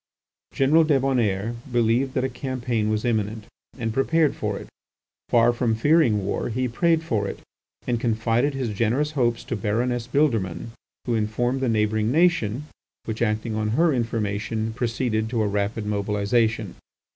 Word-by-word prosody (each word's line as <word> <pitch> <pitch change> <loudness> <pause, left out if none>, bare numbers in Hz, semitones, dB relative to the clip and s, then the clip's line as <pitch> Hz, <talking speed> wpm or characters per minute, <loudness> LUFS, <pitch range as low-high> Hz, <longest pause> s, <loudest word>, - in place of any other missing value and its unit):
General 150 +5 +4
Débonnaire 125 -8 +1 0.2
believed 120 +3 +1
that 130 - +1
a - - +2
campaign 125 -4 -2
was 110 +1 -1
imminent, 110 -2 -1 0.3
and 115 -3 -2
prepared 150 +4 +2
for - - -2
it. - - -9 0.6
Far 120 0 +4
from 120 -2 0
fearing 115 - +3
war, 100 - -2
he 125 +2 -1
prayed 165 +6 +1
for 110 -10 -1
it, - - -7 0.4
and 120 -2 0
confided 115 +4 +1
his 130 -3 -2
generous 125 +8 +1
hopes 120 -5 0
to - - -3
Baroness 115 +3 -1
Bildermann, 115 - 0 0.3
who 120 - -1
informed 120 +4 0
the 130 - +1
neighbouring 110 0 +1
nation, 150 - +2 0.4
which, 110 0 -4
acting 110 0 0
on 110 +2 -1
her 165 -1 +4
information, 110 -2 -2
proceeded 115 -2 -1
to 115 -2 0
a - - +1
rapid 105 +2 -2
mobilization. 105 +1 0
115 Hz, 150 wpm, -24 LUFS, 110-130 Hz, 0.6 s, General